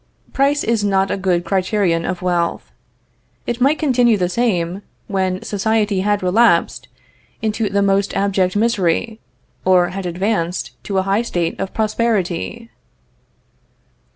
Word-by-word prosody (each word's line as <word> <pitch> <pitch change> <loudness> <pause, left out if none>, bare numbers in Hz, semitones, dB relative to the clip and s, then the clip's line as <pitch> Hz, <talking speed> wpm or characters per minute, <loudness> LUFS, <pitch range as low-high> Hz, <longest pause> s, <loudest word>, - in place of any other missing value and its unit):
Price 280 +2 +2
is 225 -2 0
not 195 -1 +1
a - - +1
good 185 -3 0
criterion 185 -3 0
of 180 -1 -4
wealth. 175 -2 -1 0.7
It 240 +1 -3
might 280 +4 +3
continue 245 -7 +3
the 180 -2 0
same 185 -4 -1 0.2
when 190 -2 -2
society 210 -1 0
had 205 0 0
relapsed 225 +6 +2 0.6
into 220 -1 0
the 200 0 +1
most 195 0 +1
abject 195 -2 +1
misery, 220 0 0 0.4
or 180 -1 +4
had 190 0 -5
advanced 180 -1 -2
to 195 - -2
a 190 - +2
high 195 +3 +1
state 175 -8 -2
of 195 - -3
prosperity. 220 0 -1
195 Hz, 130 wpm, -19 LUFS, 185-220 Hz, 0.7 s, or